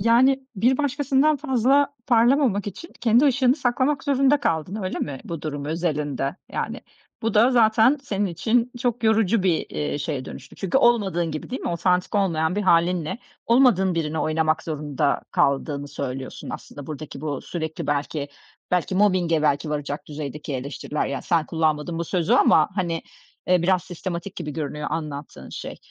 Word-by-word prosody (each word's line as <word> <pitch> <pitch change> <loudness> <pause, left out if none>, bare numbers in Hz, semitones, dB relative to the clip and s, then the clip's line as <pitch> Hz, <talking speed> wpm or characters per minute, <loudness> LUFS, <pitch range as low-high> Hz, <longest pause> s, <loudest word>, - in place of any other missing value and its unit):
Yani, 260 +5 +4
bir 250 +7 +3
başkasından 285 +1 +2
fazla 275 +1 +2
parlamamak 240 -3 +3
için 205 - -7
kendi 240 +4 +4
ışığını 260 -2 +4
saklamak 260 +2 0
zorunda 275 0 +3
kaldın, 170 - -1
öyle 185 - -3
mi 140 -3 -4
bu 165 -3 -6
durum 145 -2 -4
özelinde, 150 -2 -2 0.2
yani? - - -3 0.4
Bu 225 -1 -1
da 230 +4 +5
zaten 230 +3 +4
senin 205 -6 -1
için 230 +8 0
çok 245 -2 -1
yorucu 220 -2 +3
bir, 175 -4 +1
iii, 150 -1 -2
şeye 140 -3 -3
dönüştü. - - -10
Çünkü 195 +7 +1
olmadığın 195 - +2
gibi, 155 - -6
değil 260 - -4
mi? - - -2
Otantik 180 +3 0
olmayan 170 -3 +1
bir 210 - 0
hâlinle 180 +2 +2 0.3
olmadığın 230 -7 +4
birini 160 -1 -2
oynamak 155 0 +1
zorunda 150 -3 -1
kaldığını 140 +1 0
söylüyorsun 130 -2 -6
aslında 145 -2 -8
buradaki 150 -2 -7
bu 145 -3 -3
sürekli 160 -2 -5
belki 145 0 -2 0.4
belki 180 0 0
mobbing'e 185 -5 +2
belki 145 +1 +1
varacak 145 0 -4
düzeydeki 145 -1 -6
eleştiriler, 140 +3 -3
yani, 140 - -4
sen 165 -4 +1
kullanmadın 160 0 0
bu 170 - -1
sözü 170 -1 0
ama, 155 - +5
hani, 170 -4 -1 0.4
eee, 180 -2 +3
biraz 185 0 +2
sistematik 180 +1 -6
gibi 160 -4 -4
görünüyor 150 0 -4
anlattığın 145 - -5
şey. - - -7
175 Hz, 155 wpm, -23 LUFS, 150-230 Hz, 0.4 s, da